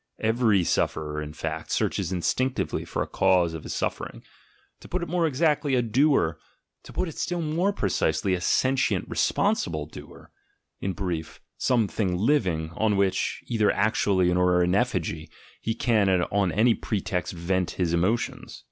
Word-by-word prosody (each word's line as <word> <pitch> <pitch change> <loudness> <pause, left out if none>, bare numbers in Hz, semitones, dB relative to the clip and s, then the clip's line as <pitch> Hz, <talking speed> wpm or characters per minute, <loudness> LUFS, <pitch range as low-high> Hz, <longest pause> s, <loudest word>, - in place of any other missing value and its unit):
Every 110 -4 +2
sufferer, 75 -2 -1
in 75 0 -6
fact, 75 - -5
searches 95 -2 -1
instinctively 130 +9 -1
for - - -2
a - - -8
cause 90 -3 +2
of 80 - -6
his - - -6
suffering; - - -4 0.6
to - - -13
put 185 0 -2
it - - -4
more 170 0 +1
exactly, 150 -1 +1
a 125 - +2
doer, 115 - +2 0.2
— - - -54
to - - -11
put 185 - -1
it 160 - -8
still 175 0 -1
more 165 +6 +1
precisely, 100 - 0
a 90 - -1
sentient 130 +7 +1
responsible 75 -3 0
doer, 75 - -13 0.3
— - - -51
in 95 - -2
brief, 85 -6 -4 0.2
something 105 -6 +1
living, 90 - +1
on 105 +2 +1
which, 100 -1 0
either 110 -4 +1
actually 100 -3 +2
or 90 0 +3
in 90 +1 +1
effigy, 85 -8 -1 0.3
he 115 - -2
can 110 -5 +2
on 95 +1 +1
any 115 +7 +4
pretext 95 -5 -3
vent 90 +1 -1
his 85 -2 0
emotions. 95 +8 -1
100 Hz, 160 wpm, -26 LUFS, 90-120 Hz, 0.6 s, any